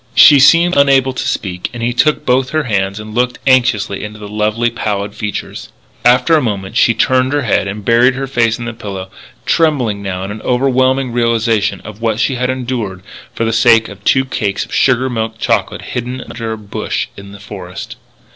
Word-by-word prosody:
She 145 -2 +8
seemed 170 +6 +5
unable 135 -2 +3
to - - -3
speak, 90 -3 -3
and 115 - -5
he 120 +1 0
took 150 +5 +1
both 130 +1 +2
her 155 -1 0
hands 100 -4 -1
and 105 0 -9
looked 125 +2 0
anxiously 120 -7 +2
into 105 +1 -7
the 105 -1 -9
lovely, 105 +3 0
pallid 105 -3 -3
features. 105 -1 -6 0.3
After 125 +6 +4
a 155 - +3
moment 100 -6 -3
she 115 - +3
turned 130 +3 +2
her 145 -1 0
head 105 -4 +1
and 100 +1 -6
buried 120 +2 +4
her 135 0 -3
face 120 -4 +1
in 120 - -6
the 120 - -4
pillow, 95 -4 -7 0.3
trembling 130 -11 +1
now 95 -2 -4
in 105 +3 -6
overwhelming 130 0 +1
realization 115 -3 0
of 105 +1 -11
what 110 -1 0
she 135 - +1
had 125 0 -1
endured 120 -7 -3 0.3
for 115 - -1
the 115 - 0
sake 115 -1 +4
of 100 -1 -12
two 130 +4 +3
cakes 100 -6 -2
of - - -13
sugar 130 0 +2
milk 110 -3 -3
chocolate - - -1
hidden 125 +1 -4
under 115 -2 -6
a 110 - -4
bush 105 -2 -4
in 100 0 -11
the 100 - -12
forest. 100 -2 -8
115 Hz, 195 wpm, -15 LUFS, 105-130 Hz, 0.3 s, She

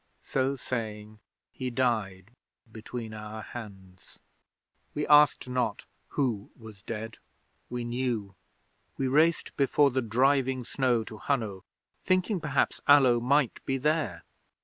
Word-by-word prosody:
So 135 +1 0
saying, 110 -4 -5 0.3
he 130 -1 -4
died 110 -6 -1 0.4
between 110 0 -7
our 110 0 -7
hands. 95 -6 -11 0.8
'We 150 - -1
asked 150 -3 +5
not 125 -5 -1 0.2
who 115 -8 -1
was 110 -4 -12
dead. 115 +1 -6 0.5
We 125 0 -3
knew! 120 -4 -2 0.6
We 135 - 0
raced 155 +5 +2
before 140 0 +3
the 130 +1 0
driving 130 +2 +2
snow 120 -1 +1
to 110 0 -10
Hunno, 110 -9 -2 0.4
thinking 185 +2 +1
perhaps 145 -3 0
Allo 135 -4 +6
might 130 +1 +1
be 135 - -1
there. 145 - 0
120 Hz, 120 wpm, -28 LUFS, 110-135 Hz, 0.8 s, Allo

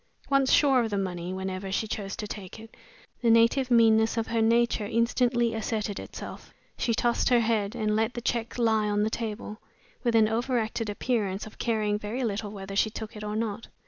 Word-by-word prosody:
Once 275 -1 +3
sure 275 -3 +5
of 225 - -2
the 205 - -1
money 180 -2 -3
whenever 190 0 -4
she 220 +3 -1
chose 195 -2 -4
to 210 - -5
take 205 -1 -8
it, 225 +1 -13 0.5
the 235 - +2
native 230 +3 +4
meanness 225 -1 +4
of 225 - +1
her 230 0 0
nature 230 -1 +2
instantly 235 +1 +1
asserted 215 -2 -2
itself. - - -9 0.2
She 230 - 0
tossed 240 +3 +1
her 245 -2 +5
head, 220 -3 0
and 215 -1 0
let 225 +2 0
the 240 - -4
check 235 0 -2
lie 220 -3 +2
on 205 0 +1
the 220 - 0
table, 215 -1 -5 0.4
with 235 -2 +1
an 220 -1 +5
overacted 230 -1 -1
appearance 205 -3 -1
of 215 - -13
caring 215 -3 0
very 220 +5 -3
little 210 -2 -2
whether 195 -1 -7
she 220 - +3
took 220 0 -7
it 210 - -7
or 210 0 -3
not. 220 -1 -3
220 Hz, 200 wpm, -27 LUFS, 210-235 Hz, 0.5 s, sure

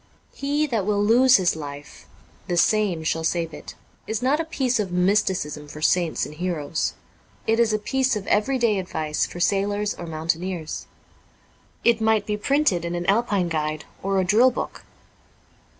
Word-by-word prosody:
'He 290 +2 0
that 225 -9 -1
will 205 -1 +2
lose 245 +4 +6
his 185 -3 +1
life, 145 -1 -9 0.4
the 175 - -1
same 190 -2 +2
shall 160 +1 -1
save 165 -1 -1
it,' - - -10 0.3
is 220 - -1
not 275 +4 +2
a - - +1
piece 265 -7 -1
of 195 -4 -2
mysticism 180 -5 0
for 150 +1 -9
saints 170 +1 +1
and - - -9
heroes. 160 -2 -2 0.5
It 225 +1 +2
is 230 -2 +3
a 215 - +2
piece 265 +4 0
of 205 -2 -4
everyday 220 -1 +2
advice 155 -4 -2
for 175 - -9
sailors 205 +2 +1
or 175 - -8
mountaineers. 165 +1 -3 1.0
I 235 -1 +5
might 220 -2 +2
be 210 - -1
printed 210 - +1
in 170 0 -3
an 175 0 -3
Alpine 200 -3 +1
guide 155 -1 -2 0.2
or 195 0 0
a - - +2
drill 220 +7 +5
book. 250 - -6
195 Hz, 165 wpm, -24 LUFS, 170-225 Hz, 1.0 s, lose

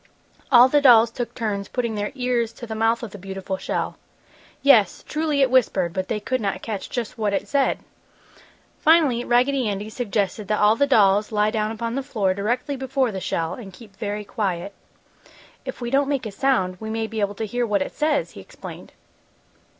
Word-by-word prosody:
All 245 -1 +8
the 290 +2 +3
dolls 235 -4 +7
took 240 -1 -5
turns 205 -4 -2
putting 235 -3 -2
their 205 -1 -3
ears 245 -3 0
to 240 - -9
the 220 - -6
mouth 225 +2 +1
of 225 - -6
the 205 - -10
beautiful 190 0 -5
shell. - - -3 0.7
Yes, 250 -8 +5
truly 300 -2 +1
it 260 - +1
whispered, 195 -9 +2
but 185 -1 -2
they 210 - -2
could 255 +4 -2
not 200 -2 -2
catch 215 -4 -5
just 240 -1 -4
what 210 -2 0
it - - -1
said. 280 -2 +1 1.0
Finally 300 -7 +4
Raggedy 250 0 +2
Andy 205 +2 -4
suggested 210 -3 -2
that 210 +1 0
all 210 +1 +5
the 280 +4 +2
dolls 210 -4 +4
lie 210 0 +2
down 215 -1 -1
upon 230 +1 -4
the 275 - -1
floor 215 -9 0
directly 240 +8 -2
before 265 -2 0
the 190 -2 -5
shell 165 -2 -2
and 195 -6 -9
keep 205 -1 -15
very 210 0 -4
quiet. 195 -2 -3 0.9
"If - - -6
we 240 0 -3
don't 275 +1 +2
make 275 -4 -1
a 215 - -4
sound 195 -6 0
we 220 - -6
may 225 0 -2
be 220 0 -5
able 205 0 -1
to 220 - -3
hear 240 +3 -1
what 200 -3 +1
it - - -8
says!" 300 -1 0
he - - -11
explained. - - -11
225 Hz, 200 wpm, -23 LUFS, 205-255 Hz, 1.0 s, All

